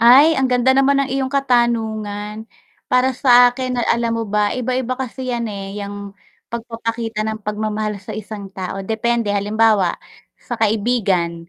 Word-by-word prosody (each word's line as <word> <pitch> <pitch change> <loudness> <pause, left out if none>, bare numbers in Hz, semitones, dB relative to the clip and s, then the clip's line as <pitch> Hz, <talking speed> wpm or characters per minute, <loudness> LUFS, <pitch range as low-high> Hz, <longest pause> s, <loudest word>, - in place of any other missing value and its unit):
Ay 275 +7 +7
ang 270 - +2
ganda 255 +1 +3
naman 275 +1 +4
ng 275 - -1
iyong 265 +1 -2
katanungan. 220 -5 0 0.4
Para 255 0 +2
sa 245 -2 +7
akin 250 0 -3
na - - 0
alam 235 0 +1
mo 230 0 -1
ba, 210 0 +1
iba-iba 255 0 -1
kasi 255 0 -5
yan, 235 -1 -2
eh, 195 -1 -6
yang 200 0 -7 0.4
pagpapakita 230 -1 -3
ng 220 0 -3
pagmamahal 210 0 -2
sa 205 +3 -9
isang 210 -1 -7
tao 190 0 -5
depende, 225 0 0
halimbawa 205 -2 +2 0.4
sa 240 - -6
kaibigan 200 -7 0
225 Hz, 150 wpm, -19 LUFS, 210-250 Hz, 0.4 s, Ay